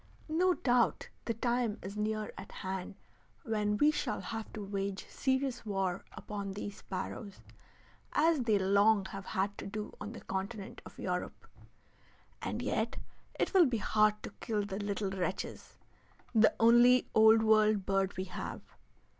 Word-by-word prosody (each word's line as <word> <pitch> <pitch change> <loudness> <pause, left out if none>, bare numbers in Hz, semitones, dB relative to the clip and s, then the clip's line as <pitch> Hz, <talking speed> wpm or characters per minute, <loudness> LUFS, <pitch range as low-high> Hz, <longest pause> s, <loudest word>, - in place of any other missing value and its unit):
No 355 +3 +3
doubt 245 -2 +2 0.2
the 230 - -1
time 240 -1 0
is 195 +2 -6
near 215 0 -2
at - - -9
hand 190 0 -5 0.5
when 210 -2 0
we 295 +4 +5
shall - - -2
have 225 -1 -5
to 210 -2 -5
wage 195 -1 -3
serious 265 -1 -1
war 195 -4 -1
upon 200 -2 -5
these 205 0 -6
sparrows, 200 +1 -6 0.7
as 320 +1 +4
they 225 -4 +3
long 200 +1 +4
have 195 0 -7
had 200 +2 -1
to - - -5
do 210 +1 -5
on 215 - -5
the - - -9
continent 195 +2 -5
of - - -15
Europe. - - -4 1.0
And - - -3
yet - - -1 0.4
it - - 0
will 365 -5 +7
be 245 -3 0
hard 215 0 +2
to - - -6
kill 210 -3 -1
the 195 0 -4
little 205 -1 -2
wretches, 185 0 -4 0.6
the 220 -1 +5
only 240 +2 +6
Old 220 0 +7
World 215 -2 +4
bird 195 -1 0
we 185 - -1
have. 185 -2 -6
210 Hz, 155 wpm, -32 LUFS, 195-230 Hz, 1.0 s, will